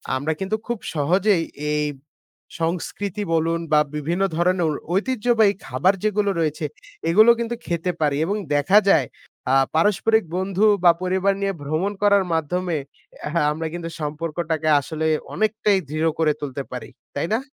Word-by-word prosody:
আমরা 145 +4 -1
কিন্তু 195 +3 -1
খুব 240 -2 -2 0.2
সহজেই 180 +4 +2 0.3
এই 150 0 +1 0.8
সংস্কৃতি 185 +4 -2
বলুন 165 +1 +1
বা 150 - +6 0.2
বিভিন্ন 170 +6 -1
ধরনের 180 +1 +2
অ 155 - +1 0.2
ঐতিহ্যবাহী 225 -1 +2
খাবার 140 +10 +2
যেগুলো 210 -1 +1
রয়েছে 155 -1 -1 0.4
এগুলো 215 +7 +7
কিন্তু 235 0 -2
খেতে 170 +1 -1
পারি 145 -2 +2
এবং 200 +5 -1 0.2
দেখা 145 +8 +4
যায় 140 -10 +4 0.4
আ - - +3 0.2
পারস্পরিক 210 +5 +3
বন্ধু 190 +2 +1 0.2
বা 175 - +8
পরিবার 190 +2 +1
নিয়ে 195 0 0
ভ্রমণ 155 +8 -1
করার 200 -1 +5
মাধ্যমে 170 +2 -1 0.6
হা 170 - +2
আমরা 160 +2 -3
কিন্তু 170 -1 -5
সম্পর্কটাকে 155 +1 -2
আসলে 160 +3 -4 0.3
অনেকটাই 215 -1 +1
দৃঢ় 155 +2 +1
করে 155 -2 +3
তুলতে 140 -1 -4
পারি। 125 - -6 0.3
তাই 145 +3 -1
না? 225 - +2
175 Hz, 145 wpm, -22 LUFS, 155-200 Hz, 0.8 s, বা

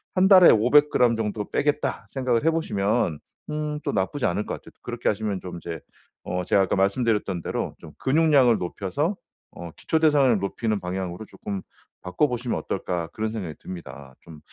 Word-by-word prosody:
'1 185 0 +4
달에 185 -3 +9
500g 125 +1 +4
정도 105 -1 -3
빼겠다.' 145 +1 -1
생각을 130 -3 0
해보시면 105 - 0 0.3
음 150 0 -2
또 - - -1
나쁘지 105 +8 -1
않을 95 +4 -1
것 - - -4
같아요. - - -15
그렇게 - - -2
하시면 105 -2 -2
좀 90 -1 -7
이제 85 -1 -6 0.4
어 90 0 -3
제가 100 - +3
아까 95 - 0
말씀드렸던 100 -2 +1
대로 - - -3
'좀 - - -12
근육량을 135 -5 +4
높여서 100 - -2 0.4
어 85 -1 -9
기초 160 - 0
대사량을 140 -8 +4
높이는 105 +2 -2
방향으로 90 +2 -4
쪼끔 100 -2 -6 0.4
바꿔보시면 120 +5 -1
어떨까.' 85 -2 -3
그런 110 0 -2
생각이 90 -9 -5
듭니다. 70 -6 -9
좀 80 -2 -13
110 Hz, 365 characters per minute, -24 LUFS, 90-140 Hz, 0.4 s, 달에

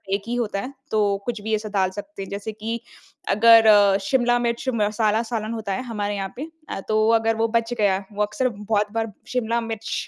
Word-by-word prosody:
एक 200 - -3
ही 240 - -2
होता 215 -4 -1
है 270 +5 -7 0.2
तो 205 -2 +2
कुछ 230 -4 -3
भी 220 +1 0
ऐसा 215 0 -5
डाल 190 -2 +1
सकते 205 +4 -8
हैं। - - -9
जैसे 200 +2 -5
कि 225 +2 -4 0.6
अगर 225 0 +7
अ, 205 -2 +6
शिमला 245 -2 +3
मिर्च 235 +2 -1
मसाला 215 +1 +1
सालन 220 0 -2
होता 215 -3 -3
है 255 - -3
हमारे 205 -4 -3
यहाँ 195 -1 -4
पे 310 +4 -5 0.2
अ, - - -4
तो 215 +1 +3
अगर 225 0 +1
वो - - +3
बच 230 +1 -5
गया 195 -1 +2
वो 210 +1 0
अक्सर 245 +5 0
बहुत 210 -1 -1
बार 225 -1 -2 0.2
शिमला 235 -1 0
मिर्च 225 -1 -5
220 Hz, 215 wpm, -23 LUFS, 205-230 Hz, 0.6 s, अगर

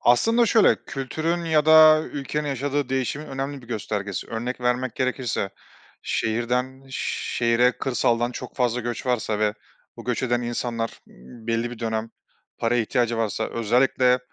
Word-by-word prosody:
Aslında 225 - +4
şöyle; 220 0 +4
kültürün 160 +6 -2
ya 155 -2 +2
da 155 0 +8
ülkenin 150 0 -3
yaşadığı 140 +1 -1
değişimin 135 +3 -2
önemli 135 0 -4
bir 120 - -16
göstergesi. 105 -4 -3
Örnek 120 +3 -4
vermek 125 0 0
gerekirse 130 -6 -1 0.5
şehirden 125 +4 -1
şehre 120 -1 +1
kırsaldan 120 -2 0
çok - - -8
fazla 125 -1 +1
göç 120 +1 -4
varsa 110 -4 0
ve 105 0 +1 0.4
bu - - -10
göç 125 +1 -1
eden 120 -1 +1
insanlar 120 -1 -3
m - - -20 0.3
belli 115 +1 0
bir 120 - -8
dönem 110 -1 -2 0.5
paraya 120 0 +2
ihtiyacı 120 0 0
varsa, 110 0 -1
özellikle 125 +2 +2
125 Hz, 140 wpm, -24 LUFS, 115-135 Hz, 0.5 s, da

